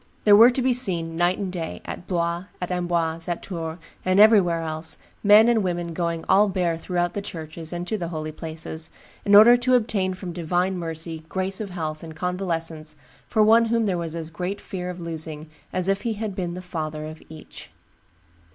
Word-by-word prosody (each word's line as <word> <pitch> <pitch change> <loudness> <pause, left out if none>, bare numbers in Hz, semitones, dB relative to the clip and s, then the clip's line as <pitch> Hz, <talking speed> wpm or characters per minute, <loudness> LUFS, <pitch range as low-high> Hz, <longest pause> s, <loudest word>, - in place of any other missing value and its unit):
There 205 -1 +7
were 230 +4 +9
to 255 0 -1
be 255 0 +3
seen 175 -9 +1
night 175 +2 +2
and 195 -3 -4
day, 165 -3 -4
at 175 - -7
Blois, 170 0 -1
at 180 0 -4
Amboise, 170 -2 -1
at 175 -1 -3
Tours, 165 -3 -5 0.3
and 185 +1 +2
everywhere 195 -6 +5
else, 160 0 -3 0.3
men 210 +2 +7
and 235 -2 +3
women 175 -2 -2
going 170 -1 -2
all 205 +2 +5
bare 180 -3 0
throughout 175 +1 -2
the 205 - -3
churches 160 -3 -7
and 175 0 -4
to 215 +3 -2
the 170 - -3
holy 155 -2 -4
places, 160 0 -6 0.4
in 200 -1 +5
order 225 +4 +9
to 250 +1 +2
obtain 200 -6 0
from 180 -2 -7
divine 180 +2 0
mercy 165 -1 -5
grace 190 +2 -2
of 205 - -5
health 155 -4 -4
and 160 -1 -9
convalescence 165 -4 -3 0.3
for 215 -2 +3
one 225 +2 +6
whom 230 0 +1
there 195 -3 0
was 170 -2 -4
as 165 -1 -5
great 180 +4 -4
fear 180 -1 -6
of 180 0 -6
losing 160 -2 -6 0.2
as 185 0 -1
if 195 0 +1
he 230 -2 -1
had 210 -2 -4
been 175 -2 -3
the 185 - -7
father 155 -3 -4
of 155 +1 -9
each." 155 -1 -12
175 Hz, 200 wpm, -24 LUFS, 165-195 Hz, 0.4 s, were